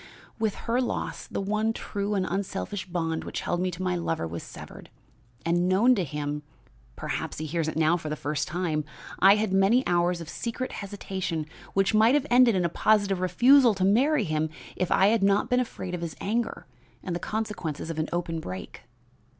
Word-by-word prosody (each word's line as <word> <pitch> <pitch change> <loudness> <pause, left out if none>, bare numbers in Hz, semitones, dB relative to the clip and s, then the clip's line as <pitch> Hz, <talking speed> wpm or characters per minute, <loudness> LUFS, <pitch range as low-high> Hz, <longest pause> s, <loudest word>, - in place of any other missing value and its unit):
"With 215 -2 0
her 240 +2 +1
loss 250 - -3
the - - -4
one 215 +3 0
true 205 -2 -3
and 190 -2 +1
unselfish 195 +1 -3
bond 165 -2 -2
which - - -4
held 175 - -1
me 185 - +1
to 180 +1 -5
my 180 -1 0
lover 165 - -2
was 85 +1 -5
severed, - - -11 0.6
and, 170 +1 +2
unknown 190 +8 +4
to 200 -6 0
him 150 -1 -3 0.5
(perhaps - - -4
he 155 - -4
hears 160 +1 -1
it 155 - -3
now 160 +2 +3
for 155 -3 -6
the 150 - -2
first 145 0 -2
time) 155 -2 -1 0.4
I 195 +2 +7
had 210 -2 -1
many 200 +7 +4
hours 175 0 +2
of 165 - -8
secret 235 - -4
hesitation 190 -5 -4 0.3
which 195 +2 +2
might 220 +5 +5
have 295 -1 +2
ended 245 -3 +6
in 180 -2 +1
a - - +4
positive 200 +1 +2
refusal 240 +6 +5
to 185 -1 +1
marry 250 +7 +3
him 155 -3 -1 0.3
if 185 - -2
I 195 - +5
had 225 -1 +2
not 200 +5 +2
been 250 - +4
afraid 210 -7 -4
of 175 - -3
his 170 -2 -4
anger 230 +4 -2 0.4
and 180 -3 -3
the - - -2
consequences 200 -8 -3
of 160 - -4
an 155 - -1
open 170 -1 -2
break. 95 - -7
185 Hz, 200 wpm, -27 LUFS, 165-215 Hz, 0.6 s, I